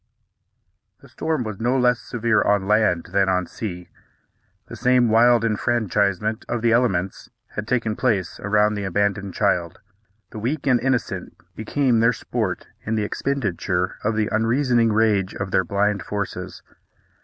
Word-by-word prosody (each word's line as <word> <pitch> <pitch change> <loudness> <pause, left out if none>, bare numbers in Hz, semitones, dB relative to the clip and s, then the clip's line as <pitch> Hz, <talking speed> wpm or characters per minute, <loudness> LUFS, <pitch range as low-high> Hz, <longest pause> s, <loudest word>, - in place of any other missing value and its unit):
The - - -16
storm 160 -5 -2
was 110 -3 -6
no 120 +3 +1
less 125 -1 +3
severe 115 -2 0
on 100 -2 +1
land 105 -5 +2
than 95 -1 +3
on 90 -1 +1
sea. 90 -3 -7 0.8
The - - -10
same 125 -1 +3
wild 115 +1 +4
enfranchisement 105 -2 0
of 120 -1 -2
the 115 - +3
elements 100 -6 0 0.2
had 105 0 -6
taken 115 -4 0
place 105 -9 -1
around 105 +1 +2
the 105 -1 -4
abandoned 100 0 -1
child. 90 -4 0 0.5
The 110 - -7
weak 135 +7 -2
and 125 -3 +3
innocent 130 -1 -2 0.2
become 120 +2 +1
their 115 +2 +4
sport - - -3 0.2
in 110 - -2
the 110 - 0
expenditure 100 -7 -2
of 110 +1 0
the 110 -1 +1
unreasoning 115 +1 +2
rage 105 -3 +1
of 95 -1 -4
their 95 - +3
blind 100 +2 0
forces. 100 +2 -5
110 Hz, 150 wpm, -22 LUFS, 100-120 Hz, 0.8 s, wild